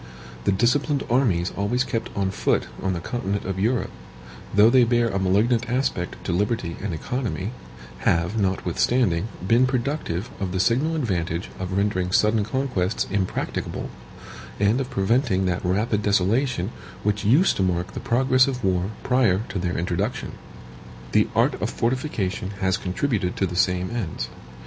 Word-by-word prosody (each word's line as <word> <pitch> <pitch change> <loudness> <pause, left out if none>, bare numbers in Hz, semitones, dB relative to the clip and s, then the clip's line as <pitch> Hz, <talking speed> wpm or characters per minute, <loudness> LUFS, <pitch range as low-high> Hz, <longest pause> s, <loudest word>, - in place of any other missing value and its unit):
The - - +4
disciplined 135 +8 +2
armies 100 -9 +2
always 105 +6 +1
kept 115 0 -3
on 95 -1 0
foot - - +1 0.2
on 95 -1 0
the 85 - -2
continent 100 +1 -3
of 95 -1 -3
Europe, 115 +5 0 0.6
though 105 +3 +6
they 130 -1 +6
bear 120 0 +2
a 95 -2 -1
malignant 110 +5 +2
aspect 125 -8 -1
to - - -2
liberty 100 -2 -1
and 100 -1 -3
economy, 110 - -3 0.5
have, 85 +4 +1
notwithstanding, 95 0 +1 0.2
been 120 +4 +5
productive 125 - -2
of 95 -3 -3
the 95 - -1
signal 135 - +2
advantage 90 - -2
of 95 0 -3
rendering 95 -3 0
sudden 105 +2 +3
conquests 110 -4 -1
impracticable, 95 -2 -2 0.7
and 105 +6 +3
of 130 - -4
preventing 100 -1 +1
that 90 -1 -1
rapid 105 +4 +1
desolation 105 +1 +1 0.3
which 105 0 0
used 135 - +4
to - - 0
mark 90 0 0
the - - -4
progress 130 +2 +3
of 125 -3 -3
war 95 0 +1
prior 120 -7 +3
to 95 - -3
their 90 0 -1
introduction. 95 +9 -2 0.8
The - - +4
art - - +2
of - - 0
fortification 115 -7 -2
has 95 -1 +2
contributed 95 0 -1
to 95 - +1
the 90 -1 -5
same 90 +1 +1
ends. 115 -9 -3
100 Hz, 155 wpm, -24 LUFS, 95-120 Hz, 0.8 s, though